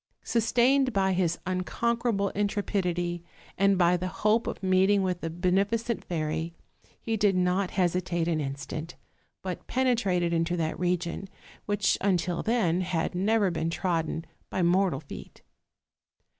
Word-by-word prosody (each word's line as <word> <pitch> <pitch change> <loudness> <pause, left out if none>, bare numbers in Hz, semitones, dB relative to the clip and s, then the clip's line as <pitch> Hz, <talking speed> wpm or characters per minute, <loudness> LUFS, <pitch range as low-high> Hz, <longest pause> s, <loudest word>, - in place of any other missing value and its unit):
Sustained 245 +3 +2
by 190 -2 +2
his 175 -2 +1
un 185 0 -1
conquerable 230 0 0
intrepidity, 180 -4 -1 0.3
and 195 0 +3
by 175 0 +4
the 180 +1 -2
hope 215 +5 +1
of - - -5
meeting 190 +2 +3
with 180 -2 -1
the 165 - -3
beneficent 195 +7 0
fairy, 160 0 -3 0.4
he 225 - -2
did 205 -2 +2
not 180 +1 +1
hesitate 175 -2 +1
an 165 -2 +1
instant, 140 +4 -5 0.5
but 185 -1 -5
penetrated 210 -9 +1
into 165 +1 0
that 160 -1 -2
region 180 +1 -1 0.4
which 205 -1 +1
until 180 -3 +1
then 185 -7 +1
had 180 -2 -1
never 200 +1 +2
been 165 -1 -1
trodden 165 -2 -1 0.2
by 185 - -1
mortal 175 -4 +2
feet. 145 - -11
185 Hz, 135 wpm, -28 LUFS, 170-205 Hz, 0.5 s, by